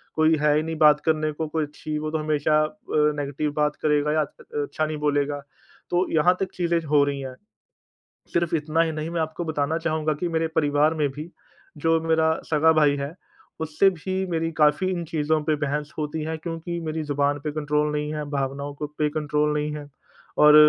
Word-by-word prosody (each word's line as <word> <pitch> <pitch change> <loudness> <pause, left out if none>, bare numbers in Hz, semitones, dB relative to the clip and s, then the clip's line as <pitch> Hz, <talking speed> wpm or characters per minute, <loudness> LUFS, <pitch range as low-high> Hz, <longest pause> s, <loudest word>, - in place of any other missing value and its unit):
कोई 155 0 +4
है 150 0 +4
ही 155 - +2
नहीं 160 0 -3
बात 150 -1 +6
करने 155 -1 +1
को 160 +1 -4
कोई 155 0 -1
छि 155 -1 -4
वो 155 0 -3
तो 160 - 0
हमेशा 155 0 +2
अ, 155 - -2 0.2
नेगेटिव 150 -1 +1
बात 150 0 +2
करेगा 150 0 +2
या 155 - +3
अ, - - 0 0.4
अच्छा 145 +2 -2
नहीं 155 0 -3
बोलेगा 145 -1 0 0.5
तो 180 +1 +2
यहाँ 175 +3 +4
तक 195 - -2
चीज़ें 170 -1 +1
हो 145 -1 +4
रही 140 -1 -2
हैं। 130 -1 -6 1.0
सिर्फ़ 170 -1 +1
इतना 155 +2 0
ही 160 -1 0
नहीं 155 +1 -4
मैं 170 -1 -1
आपको 160 +2 -3
बताना 155 0 -1
चाहूँगा 155 -2 0
कि 175 - 0
मेरे 165 -1 0
परिवार 150 +1 +3
में 150 -2 +1
भी 155 +4 -8 0.5
जो 165 +2 +2
मेरा 160 0 +2 0.2
सगा 160 +1 +5
भाई 150 -3 +4
है 140 +3 -4 0.5
उससे 160 +5 +3
भी 190 +2 -3
मेरी 165 0 0
काफ़ी 155 +4 +3
इन 175 -2 -2
चीज़ों 155 0 0
पर 155 0 +1
बहस 150 +1 -3
होती 155 +1 -2
है 160 0 -3
क्योंकि 165 +1 -5
मेरी 160 0 -3
ज़ुबान 145 0 0
पे 150 - -1
कंट्रोल 150 0 0
नहीं 150 0 -2
है 150 -1 -3
भावनाओं 140 0 -3
को 150 +1 -4
पे 150 0 -1
कोई 155 +1 -3
कंट्रोल 150 0 +1
नहीं 150 0 -2
है 150 - -7 0.6
और 150 - +8
155 Hz, 205 wpm, -24 LUFS, 150-160 Hz, 1.0 s, और